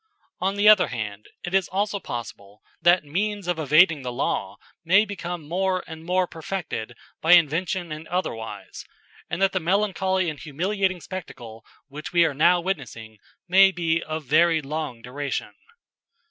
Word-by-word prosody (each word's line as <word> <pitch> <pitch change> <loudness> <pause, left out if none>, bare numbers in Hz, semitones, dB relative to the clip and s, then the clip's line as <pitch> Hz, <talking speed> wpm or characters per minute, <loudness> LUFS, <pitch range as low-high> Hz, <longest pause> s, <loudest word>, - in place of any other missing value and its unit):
On 190 +2 0
the 205 +1 +3
other 210 -3 +7
hand 105 -3 -6 0.2
it 175 - -5
is 195 -1 +2
also 200 +2 -1
possible 105 - -8 0.2
that 175 0 +5
means 200 +6 -2
of 175 -2 -1
evading 155 +1 +4
the 125 -1 -4
law 100 -5 -2 0.3
may 190 +6 +5
become 175 -6 -6
more 185 +2 0
and 160 0 -10
more 180 +2 +1
perfected 160 - -5 0.2
by 165 +2 +5
invention 170 +1 +2
and 155 +1 -7
otherwise, 115 - -5 0.5
and 170 - -3
that 195 - +4
the 190 - 0
melancholy 190 0 +1
and 155 -3 -4
humiliating 185 +4 -1
spectacle 120 -13 -9 0.2
which 150 +7 -8
we 170 -1 +5
are 155 - 0
now 170 +5 +4
witnessing 120 - -5 0.3
may 195 +2 +7
be 170 -2 0
of 155 0 -5
very 165 +4 +4
long 145 -5 -5
duration. 140 +3 -4
170 Hz, 155 wpm, -24 LUFS, 145-185 Hz, 0.5 s, other